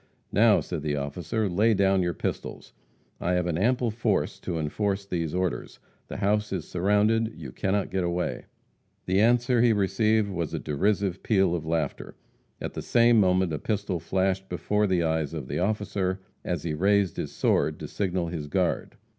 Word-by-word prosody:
"Now," 110 Hz, 0 st, +5 dB
said 85 Hz, -4 st, -5 dB
the 75 Hz, -1 st, -1 dB
officer, 80 Hz, +9 st, -2 dB
"lay 105 Hz, +5 st, +3 dB
down 95 Hz, -1 st, +3 dB
your 85 Hz, -2 st, -1 dB
pistols. -, -, -5 dB, 0.5 s
I 90 Hz, -, 0 dB
have 90 Hz, -1 st, +1 dB
an 85 Hz, -1 st, -1 dB
ample 120 Hz, +2 st, +2 dB
force 110 Hz, -2 st, -1 dB
to 85 Hz, -3 st, -4 dB
enforce 100 Hz, +6 st, -1 dB
these 85 Hz, -4 st, -2 dB
orders. 90 Hz, -1 st, -2 dB, 0.3 s
The -, -, -6 dB
house 105 Hz, +1 st, +1 dB
is 90 Hz, -5 st, -3 dB
surrounded; 105 Hz, +5 st, +1 dB
you 75 Hz, -6 st, -8 dB
cannot 100 Hz, +8 st, -1 dB
get 95 Hz, -1 st, 0 dB
away." 85 Hz, 0 st, -2 dB, 0.6 s
The 95 Hz, +2 st, +2 dB
answer 120 Hz, +1 st, +3 dB
he 120 Hz, -2 st, +5 dB
received 105 Hz, +1 st, +2 dB
was 85 Hz, -4 st, -3 dB
a -, -, -2 dB
derisive 95 Hz, +5 st, 0 dB
peal 95 Hz, -5 st, +2 dB
of 80 Hz, -2 st, -3 dB
laughter. 80 Hz, -3 st, -2 dB, 0.4 s
At -, -, -5 dB
the -, -, -4 dB
same 120 Hz, -1 st, +4 dB
moment 95 Hz, -3 st, +2 dB
a 75 Hz, -, -2 dB
pistol 100 Hz, -3 st, -2 dB
flashed 95 Hz, +2 st, -1 dB
before 105 Hz, +4 st, 0 dB
the 90 Hz, -3 st, +1 dB
eyes 80 Hz, -1 st, -1 dB
of 70 Hz, -5 st, -5 dB
the -, -, -2 dB
officer 100 Hz, -1 st, -1 dB, 0.2 s
as 85 Hz, -4 st, -3 dB
he 80 Hz, -2 st, -2 dB
raised 100 Hz, +3 st, +2 dB
his -, -, -3 dB
sword -, -, +1 dB
to -, -, -7 dB
signal 90 Hz, -4 st, -2 dB
his 80 Hz, -3 st, -5 dB
guard. 70 Hz, -, -1 dB
95 Hz, 180 wpm, -26 LUFS, 85-105 Hz, 0.6 s, Now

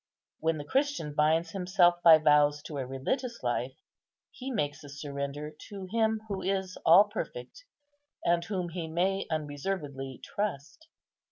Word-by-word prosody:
When 160 Hz, 0 st, 0 dB
the 145 Hz, -, -5 dB
Christian 270 Hz, -, 0 dB
binds 160 Hz, +3 st, +2 dB
himself 180 Hz, -2 st, +3 dB
by 165 Hz, -2 st, +10 dB
vows 150 Hz, -1 st, +4 dB
to 145 Hz, -3 st, -6 dB
a 130 Hz, -, -3 dB
religious 235 Hz, -, -3 dB
life, 125 Hz, +2 st, -1 dB, 0.6 s
he 260 Hz, +1 st, -7 dB
makes 150 Hz, -, -2 dB
a 145 Hz, -, -10 dB
surrender 140 Hz, +1 st, -5 dB, 0.2 s
to 195 Hz, -2 st, -7 dB
Him 220 Hz, -1 st, +1 dB
who 195 Hz, -2 st, -3 dB
is 190 Hz, -1 st, -1 dB
all 175 Hz, +5 st, +8 dB
perfect, -, -, -7 dB, 0.6 s
and 170 Hz, 0 st, +3 dB
whom 185 Hz, -3 st, -3 dB
he 170 Hz, -1 st, -5 dB
may 185 Hz, +4 st, 0 dB
unreservedly 145 Hz, -3 st, -4 dB
trust. 205 Hz, -, -4 dB
165 Hz, 145 wpm, -29 LUFS, 145-195 Hz, 0.6 s, by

